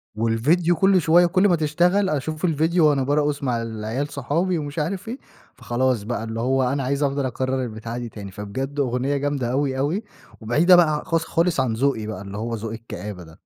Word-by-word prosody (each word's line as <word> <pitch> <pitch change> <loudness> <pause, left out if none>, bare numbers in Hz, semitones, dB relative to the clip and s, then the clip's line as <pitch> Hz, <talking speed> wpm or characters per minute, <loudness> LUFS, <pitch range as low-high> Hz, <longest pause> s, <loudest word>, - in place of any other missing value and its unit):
والڤيديو 140 +11 +2
كل 190 +2 +4
شوية، 170 +3 +5
كل 185 +3 +3
ما 180 - +4
تشتغل 175 +6 +2
أشوف 155 +3 -2
الڤيديو 165 +1 +1
وأنا 145 -4 +4
بارقص 145 +1 0
مع 120 -3 0
العيال 115 +4 -3
صحابي، 165 +7 -1
ومش 145 0 -4
عارف 185 +7 -3
إيه، 240 +4 -4 0.4
فخلاص 125 -2 0
بقى 115 0 -3
اللي 115 0 -5
هو 130 +3 +1
أنا 135 +2 0
عايز 140 +3 0
أفضل 140 0 0
أكرر 130 +1 -1
البتاعة 115 0 -6
دي 120 -1 -5
تاني، 100 -3 -9
فبجد 130 +9 -5
أغنية 130 +1 0
جامدة 140 -3 -1
أوي، 135 0 0
أوي 155 +11 -1 0.4
وبعيدة 150 +12 +5
بقى 175 -3 +5
ع 150 - -4
خالص، 165 -1 0
خالص 165 -3 0
عن 130 -4 +1
ذوقي 115 -2 0
بقى، 110 -1 -5
اللي 100 +1 -7
هو 115 +1 -3
ذوق 110 0 -5
الكآبة 105 -4 -7
ده. 80 -1 -16
135 Hz, 200 wpm, -23 LUFS, 115-160 Hz, 0.4 s, شوية